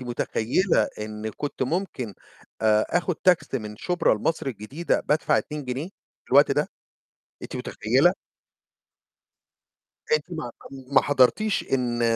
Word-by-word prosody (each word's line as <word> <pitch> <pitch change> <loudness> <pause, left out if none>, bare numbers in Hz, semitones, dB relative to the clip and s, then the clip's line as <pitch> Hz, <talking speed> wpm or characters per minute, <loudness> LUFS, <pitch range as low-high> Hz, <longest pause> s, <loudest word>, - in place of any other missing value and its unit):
متخيلة 125 - +1
إن 105 0 -5
كنت 145 +6 -4
ممكن 130 - -2 0.5
آآ 110 -1 +4
آخد 175 0 +1
تاكسي 175 -7 +2
من 105 -2 -8
شبرا 175 0 +1
لمصر 150 +7 -1
الجديدة 135 +8 -2
بادفع 150 +1 +3
2 150 -2 -5
جنيه؟ 130 +5 -3 0.4
في - - -12
الوقت - - +7
ده؟ - - 0 0.7
أنتِ - - -7
متخيلة؟ - - +2 2.0
أنتِ 465 - +3
ما - - -4 0.4
ما 135 - +6
حضرتيش 145 +10 +3
إن 120 -3 0
130 Hz, 120 wpm, -25 LUFS, 110-165 Hz, 2.0 s, الوقت